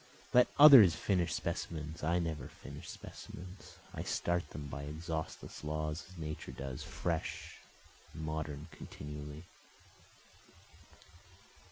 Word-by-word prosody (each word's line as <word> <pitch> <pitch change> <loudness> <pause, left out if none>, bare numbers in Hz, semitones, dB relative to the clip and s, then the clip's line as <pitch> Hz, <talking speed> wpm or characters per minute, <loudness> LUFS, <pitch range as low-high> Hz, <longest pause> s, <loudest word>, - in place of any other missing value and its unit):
Let 125 0 +7
others 135 - +11
finish 90 0 +1
specimens, 80 0 -3
I 85 +3 +3
never 80 -3 -2
finish - - -10
specimens, 90 +2 -10 0.2
I - - -4
start 85 -3 0
them 75 0 -6
by 70 0 -5
exhaustless 80 +2 -5
laws 75 +1 -2
as 95 - -13
Nature 75 -1 -5
does, 65 -2 -5
fresh - - -3 0.5
and 80 - -7
modern 75 -2 -3
continually. 75 +1 -8
80 Hz, 110 wpm, -34 LUFS, 75-85 Hz, 0.5 s, others